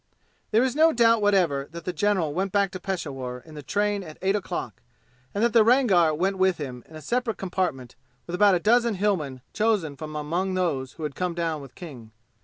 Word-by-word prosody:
There 225 +3 +3
is 260 0 0
no 320 +2 +5
doubt 230 -4 +4
whatever 175 -9 +2
that 170 0 -9
the 180 - -2
general 185 -7 +1
went 190 +3 -1
back 200 -1 +2
to 185 - -6
Peshawur 135 -10 -5
in 160 - -13
the 150 - -8
train 205 +6 0
at 155 -4 -10
eight 195 +1 +2
o'clock 205 - -4 0.5
and 205 - -1
that 235 - +2
the 230 -2 +6
Rangar 215 -9 +4
went 190 +4 -1
with 190 -1 +3
him 125 -5 -6
in 160 - -13
a 155 - -9
separate 240 -3 -1
compartment 180 -10 -3 0.3
with 170 - -8
about 200 +1 +5
a - - +1
dozen 235 +3 +3
Hillmen 170 -10 -1
chosen 210 -9 +1
from 155 +2 -8
among 175 +6 -2
those 145 -8 -1
who 160 - -9
had 150 -2 -3
come 180 +1 -2
down 165 -3 -2
with 135 -2 -13
King. 130 -11 -10
180 Hz, 210 wpm, -25 LUFS, 150-205 Hz, 0.5 s, the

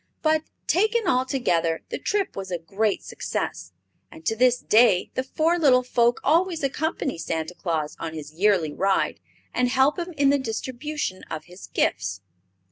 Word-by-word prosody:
But, 310 0 +3 0.2
taken 435 +6 +2
all 260 -7 +2
together, 170 -12 0
the - - -4
trip 405 -2 -1
was 195 -1 -5
a 180 - -1
great 200 +5 -1
success, - - -4 0.4
and 325 0 -14
to 225 - +1
this 250 +1 +4
day 220 -6 +4
the - - 0
four 315 +6 +1
little 255 -5 +5
folk 240 -1 +2
always 335 +2 +2
accompany 275 - -1
Santa 160 +1 -3
Claus 160 -5 -2
on 160 -1 -5
his 155 -1 -8
yearly 175 -4 +2
ride 195 +3 +1 0.3
and 250 - +2
help 265 +6 +3
him 350 +1 -4
in 280 -1 +4
the 285 - +2
distribution 260 -2 -4
of 155 -1 -5
his 180 +2 -12
gifts. 95 +2 -1
245 Hz, 165 wpm, -25 LUFS, 180-300 Hz, 0.4 s, little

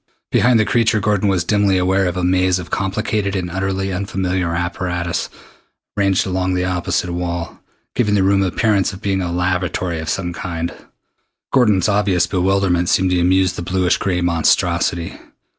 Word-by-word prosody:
Behind 120 -2 +4
the 110 - +3
creature 115 -1 +2
Gordon 105 0 +1
was 90 -3 +1
dimly 100 0 +2
aware 95 +1 +2
of 90 +1 -3
a 90 - -1
maze 90 0 +2
of 90 -1 -8
complicated 100 +1 -1
and 90 -2 -3
utterly 95 +1 -2
unfamiliar 90 -2 -2
apparatus 90 0 -2 0.7
ranged 100 -2 +2
along 95 0 -1
the 90 0 0
opposite 90 0 -1
wall, 85 -1 -4 0.3
giving 105 -4 +1
the 100 - +3
room 100 +1 +3
the 95 - +1
appearance 100 +1 +1
of 95 - -10
being 95 -1 0
a 85 -2 -2
laboratory 90 -1 -1
of 80 - -5
some 90 -2 -2
kind. 85 -1 -4 0.8
Gordon's 105 -9 +3
obvious 100 -4 +2
bewilderment 90 -1 +1
seemed 95 0 +2
to 90 - +2
amuse 95 +1 +3
the 90 - -6
bluish 90 +1 +1
gray 90 -2 -1
monstrosity. 85 0 +1
95 Hz, 165 wpm, -18 LUFS, 90-95 Hz, 0.8 s, Behind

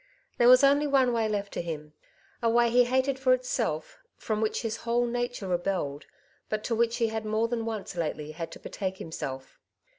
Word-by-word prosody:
There 240 - +6
was 255 +2 +8
only 285 +2 +5
one 265 -3 +3
way 225 -2 +1
left 200 -1 -2
to - - -2
him 155 -3 -6 0.2
— - - -33
a 230 - +2
way 235 0 +3
he 245 +1 +5
hated 260 +2 +1
for 255 -1 +5
itself, 255 - -3 0.2
from 215 -1 -2
which 220 +2 -1
his 225 -1 -2
whole 240 +1 0
nature 245 -3 -3
re 180 -1 +2
belled, 175 -6 -3 0.4
but 215 0 -2
to 235 - -1
which 235 +1 +1
he 230 -2 +1
had 220 0 -3
more 215 +1 0
than 230 -1 -2
once 220 -4 -4
lately 155 -2 -3
had 165 +1 -6
to - - -10
betake 190 -2 -4
himself. 135 -6 -6
225 Hz, 210 wpm, -28 LUFS, 190-245 Hz, 0.4 s, was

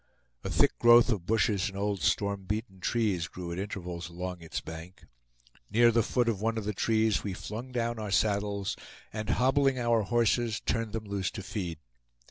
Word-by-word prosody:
A - - -3
thick - - +2
growth 120 +1 +7
of 95 -6 -2
bushes 105 -3 +2
and 95 - -9
old 100 -1 -1
storm 100 -1 0
beaten 105 -1 -4
trees 100 -6 0
grew 90 0 -7
at 85 - -4
intervals 90 -4 -5
along 90 0 -5
its 80 - -4
bank. 85 +3 -10 0.7
Near 120 +1 +5
the 115 0 +3
foot 120 +2 +1
of 105 -4 0
one 115 +1 0
of 110 - -3
the 105 - -1
trees 110 -1 +1
we 100 - -3
flung 115 +7 -6
down 120 -2 -1
our 105 -1 -4
saddles, 100 -1 0 0.4
and 110 0 -4
hobbling 135 +2 +3
our 120 -2 +2
horses 115 0 +1
turned 115 -2 -2
them 110 -1 -3
loose 100 -2 -2
to 100 - -7
feed. 90 -6 -4
105 Hz, 185 wpm, -29 LUFS, 95-115 Hz, 0.7 s, growth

